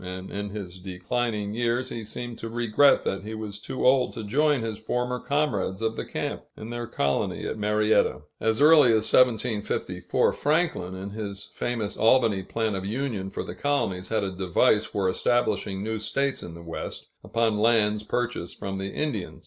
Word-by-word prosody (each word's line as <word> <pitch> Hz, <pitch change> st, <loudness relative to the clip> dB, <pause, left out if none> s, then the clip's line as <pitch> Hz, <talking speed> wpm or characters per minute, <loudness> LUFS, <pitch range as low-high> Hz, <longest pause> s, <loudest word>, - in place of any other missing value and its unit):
and 90 Hz, +1 st, -7 dB
in 100 Hz, 0 st, -4 dB
his 95 Hz, -3 st, -7 dB
declining 105 Hz, +3 st, -2 dB
years 120 Hz, +2 st, 0 dB
he 115 Hz, -, -5 dB
seemed 120 Hz, +2 st, -6 dB
to 115 Hz, -, -6 dB
regret 120 Hz, +4 st, +4 dB
that 95 Hz, -, -2 dB
he 110 Hz, +1 st, -5 dB
was 105 Hz, -2 st, -6 dB
too 130 Hz, -, -4 dB
old 130 Hz, 0 st, +4 dB
to 115 Hz, -, -6 dB
join 145 Hz, +4 st, +2 dB
his 110 Hz, -2 st, -4 dB
former 125 Hz, +2 st, -1 dB
comrades 140 Hz, -11 st, 0 dB
of 110 Hz, 0 st, -1 dB
the -, -, -3 dB
camp, -, -, -4 dB, 0.2 s
in 110 Hz, +2 st, -7 dB
their 120 Hz, 0 st, -4 dB
colony 70 Hz, -11 st, -1 dB
at -, -, -2 dB
Marietta. 105 Hz, 0 st, +2 dB, 0.2 s
As 110 Hz, +5 st, +2 dB
early 150 Hz, -3 st, +8 dB
as 110 Hz, 0 st, +1 dB
1754, 115 Hz, -3 st, +2 dB
Franklin, 150 Hz, -, 0 dB
in 95 Hz, +2 st, -6 dB
his 100 Hz, -2 st, -5 dB
famous 115 Hz, -4 st, -2 dB
Albany 110 Hz, -4 st, +4 dB
Plan 110 Hz, +3 st, -2 dB
of 95 Hz, -1 st, -3 dB
Union 105 Hz, -2 st, -2 dB
for -, -, -4 dB
the -, -, -6 dB
colonies, 100 Hz, -11 st, -1 dB
had 110 Hz, -2 st, +1 dB
a 95 Hz, -1 st, -3 dB
device 90 Hz, -2 st, +3 dB
for 100 Hz, -2 st, -1 dB
establishing 100 Hz, -1 st, +1 dB
new 110 Hz, 0 st, -2 dB
states 135 Hz, +5 st, -1 dB
in 85 Hz, -, -8 dB
the 85 Hz, -, -10 dB
West, 85 Hz, 0 st, -5 dB, 0.2 s
upon 115 Hz, -2 st, +1 dB
lands 105 Hz, -2 st, +3 dB
purchased 115 Hz, -5 st, -3 dB
from 95 Hz, -1 st, -4 dB
the 95 Hz, 0 st, -3 dB
Indians. 135 Hz, -12 st, -3 dB
110 Hz, 180 wpm, -26 LUFS, 100-120 Hz, 0.2 s, early